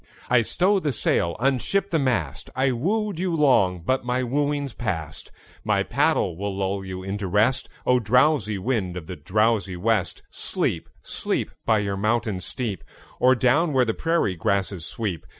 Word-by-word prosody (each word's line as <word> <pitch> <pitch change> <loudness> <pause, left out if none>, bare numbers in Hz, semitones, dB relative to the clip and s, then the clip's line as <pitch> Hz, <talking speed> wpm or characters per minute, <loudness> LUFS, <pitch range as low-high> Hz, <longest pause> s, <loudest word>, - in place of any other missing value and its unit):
I 125 -1 +6
stow 190 - +2
the 150 -5 -1
sail, 85 -7 0
unship 135 - 0
the 165 - +2
mast: 115 - -1
I 130 +1 +2
wooed 195 - -1
you 180 -2 0
long 115 - +3
but 130 +4 +1
my 125 +1 0
wooing's 140 +1 -1
past; 80 - -4 0.3
My - - +1
paddle 85 - +1
will 100 +2 -4
lull 95 0 -1
you 95 -1 -6
into 100 +1 -3
rest. 105 +7 +1 0.2
O! 125 0 +4
drowsy 125 -1 +2
wind 95 -4 -1
of 85 - -7
the 90 - -6
drowsy 100 +3 0
west, 105 -1 0
Sleep, - - -2
sleep, - - -2 0.2
By 110 - +4
your 100 -1 -1
mountain 110 -1 0
steep, 110 -1 -4 0.4
Or 130 +1 +5
down 140 +6 +2
where 130 -2 +4
the 110 - 0
prairie 165 - 0
grasses 95 -1 -1
sweep! 100 -8 -4
115 Hz, 165 wpm, -24 LUFS, 95-130 Hz, 0.4 s, I